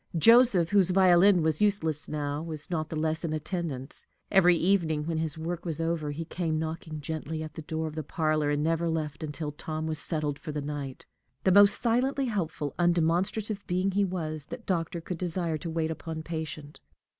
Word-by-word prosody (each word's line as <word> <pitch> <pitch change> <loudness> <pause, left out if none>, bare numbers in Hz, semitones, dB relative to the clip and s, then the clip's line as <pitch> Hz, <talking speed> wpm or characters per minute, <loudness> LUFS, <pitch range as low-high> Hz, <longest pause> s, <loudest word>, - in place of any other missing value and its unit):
Joseph, 225 -3 +6
whose 195 -3 +5
violin 185 -1 +5
was 160 +1 +1
useless 160 -8 +1
now, 145 -1 -2
was 160 0 -4
not 155 -2 -1
the - - -4
less 160 +1 -1
in 160 -2 -2
attendance. 155 -4 -4 0.2
Every 180 -3 +6
evening, 165 -5 +1
when 165 -1 -1
his 160 -1 -1
work 165 +1 -4
was 165 -3 -4
over, 165 -2 -1
he 155 +3 -4
came 160 -2 -2
knocking 160 -1 -4
gently 155 +1 -4
at 155 - -8
the - - -7
door 160 +1 -3
of 155 - -5
the 155 - -3
parlor, 155 0 0
and 145 0 0
never 165 +1 +1
left 155 -2 -3
until 150 0 -4
Tom 155 +1 -5
was 160 -1 -2
settled 150 -3 0
for 155 - -6
the 150 - -3
night. 145 -2 -5 0.4
The 190 - +4
most 200 +2 +6
silently 260 +4 +1
helpful, 165 - -2
undemonstrative 175 +5 +1
being 185 +2 +1
he 200 +1 +2
was, 155 -6 -3
that 250 -2 -8
doctor 170 -2 -1
could 170 0 -6
desire 170 -3 +1
to 170 - -5
wait 160 0 -1
upon 160 0 -6
patient. 155 -2 -6
160 Hz, 190 wpm, -28 LUFS, 155-180 Hz, 0.4 s, Joseph